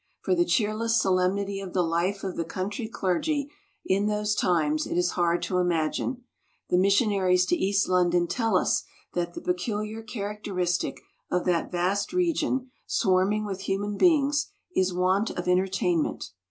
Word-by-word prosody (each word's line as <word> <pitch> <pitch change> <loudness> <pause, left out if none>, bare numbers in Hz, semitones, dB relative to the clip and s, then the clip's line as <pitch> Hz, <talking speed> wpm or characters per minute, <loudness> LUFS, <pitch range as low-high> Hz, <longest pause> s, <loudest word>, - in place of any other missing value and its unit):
For - - +1
the 345 -1 +3
cheerless 225 -3 +1
solemnity 195 +1 +1
of 190 -2 -7
the 180 - +2
life 175 +4 -1
of 190 -2 -3
the 165 - -1
country 200 - -4
clergy 280 - -1 0.3
in 200 +2 +1
those 210 0 0
times 155 -6 +1
it - - -2
is 175 0 +2
hard 175 -1 +1
to 180 - 0
imagine. 175 +9 -1 0.5
The 180 - +4
missionaries 195 -2 +3
to 180 - +2
East 195 +2 +1
London 175 -1 +3
tell 225 0 +1
us - - +1 0.3
that 175 -1 -2
the - - -6
peculiar 210 +4 -2
characteristic 205 -5 -3 0.3
of 180 - 0
that 175 -2 0
vast 190 - 0
region, 305 -8 0 0.2
swarming 195 +2 +2
with 195 -2 -5
human 200 +1 -2
beings, 295 - +3 0.3
is 185 0 +2
want 185 +4 +1
of 175 0 -5
entertainment. 180 -2 0
195 Hz, 155 wpm, -26 LUFS, 180-215 Hz, 0.5 s, The